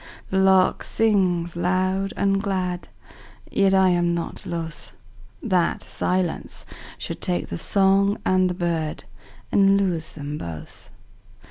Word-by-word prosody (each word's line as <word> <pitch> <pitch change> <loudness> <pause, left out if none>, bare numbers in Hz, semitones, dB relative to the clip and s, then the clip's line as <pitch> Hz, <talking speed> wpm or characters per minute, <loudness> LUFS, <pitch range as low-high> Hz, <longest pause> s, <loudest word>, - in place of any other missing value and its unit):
The 190 - +2
lark 190 -1 +4
sings 185 -6 +1
loud 185 +2 0
and 195 0 +2
glad, 185 -3 -2 0.6
Yet 195 -1 +3
I 190 -1 +5
am 175 -1 +2
not 170 - -5
lothThat 150 - -4
silence 180 -2 -2 0.3
should - - -6
take 90 0 -2
the 85 - -4
song 195 +1 +3
and 185 0 +3
the 180 - -3
birdAnd 175 +3 -1
lose 180 -5 -1
them 145 0 -6
both. 80 -2 -9
180 Hz, 115 wpm, -23 LUFS, 165-195 Hz, 0.6 s, I